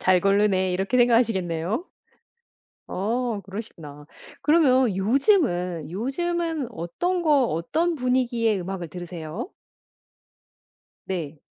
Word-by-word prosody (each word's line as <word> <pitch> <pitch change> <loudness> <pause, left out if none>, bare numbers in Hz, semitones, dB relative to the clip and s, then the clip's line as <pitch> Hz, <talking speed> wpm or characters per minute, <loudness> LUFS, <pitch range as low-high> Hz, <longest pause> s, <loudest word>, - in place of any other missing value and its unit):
'잘 185 -1 +4
고르네.' 195 -1 +2
이렇게 195 +7 0
생각하시겠네요? 225 - +2 1.0
어 225 +2 -1
그러시구나. 165 -8 -9 0.4
그러면 265 - +4
요즘은, 190 - +1
요즘은 320 - -2
어떤 290 - -2
거, 295 -6 +4
어떤 315 - 0
분위기의 240 -5 +1
음악을 180 -1 -5
들으세요? 175 - -7 1.5
네. 160 -6 -5
210 Hz, 240 characters per minute, -24 LUFS, 180-260 Hz, 1.5 s, 잘